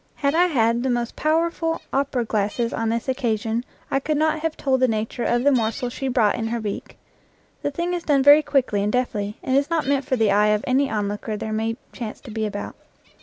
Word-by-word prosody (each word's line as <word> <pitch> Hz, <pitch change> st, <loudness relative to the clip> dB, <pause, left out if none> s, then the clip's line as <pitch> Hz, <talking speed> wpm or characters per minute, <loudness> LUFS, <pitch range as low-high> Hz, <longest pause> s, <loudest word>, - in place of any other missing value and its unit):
Had 280 Hz, 0 st, 0 dB
I 350 Hz, +2 st, +4 dB
had 235 Hz, -6 st, +2 dB
the 260 Hz, -, -1 dB
most 240 Hz, -1 st, -1 dB
powerful 325 Hz, +1 st, 0 dB
opera 270 Hz, -3 st, 0 dB
glasses 215 Hz, +2 st, -1 dB
on 225 Hz, 0 st, -1 dB
this 230 Hz, 0 st, -1 dB
occa 240 Hz, -4 st, 0 dB
sion, 225 Hz, +2 st, -2 dB, 0.3 s
I 270 Hz, -, +2 dB
could 300 Hz, +2 st, -1 dB
not 315 Hz, +1 st, +1 dB
have 320 Hz, 0 st, -2 dB
told 265 Hz, -2 st, +1 dB
the 255 Hz, -, +4 dB
nature 225 Hz, +2 st, -2 dB
of 240 Hz, +1 st, +1 dB
the 285 Hz, -, +5 dB
morsel 245 Hz, 0 st, 0 dB
she 270 Hz, -, -4 dB
brought 235 Hz, -5 st, +3 dB
in 225 Hz, -, -2 dB
her 235 Hz, +1 st, -2 dB
beak. 210 Hz, -2 st, -5 dB, 0.6 s
The -, -, -1 dB
thing 340 Hz, +5 st, -2 dB
is 350 Hz, -, -2 dB
done 285 Hz, -4 st, +2 dB
very 290 Hz, +2 st, +8 dB
quickly 260 Hz, -8 st, +1 dB
and 205 Hz, +1 st, 0 dB
deftly, 210 Hz, -4 st, -1 dB
and 260 Hz, -, 0 dB
is 280 Hz, +2 st, +2 dB
not 330 Hz, -2 st, 0 dB
meant 280 Hz, 0 st, +1 dB
for 260 Hz, -, 0 dB
the 220 Hz, -4 st, +2 dB
eye 210 Hz, +1 st, +4 dB
of 210 Hz, 0 st, +2 dB
any 270 Hz, +2 st, +2 dB
onlooker 210 Hz, 0 st, -2 dB
there 220 Hz, 0 st, -4 dB
may 225 Hz, +1 st, -1 dB, 0.2 s
chance 225 Hz, -4 st, -6 dB
to 250 Hz, -, -10 dB
be 220 Hz, 0 st, -1 dB
about. 205 Hz, 0 st, -6 dB
245 Hz, 230 wpm, -23 LUFS, 220-280 Hz, 0.6 s, very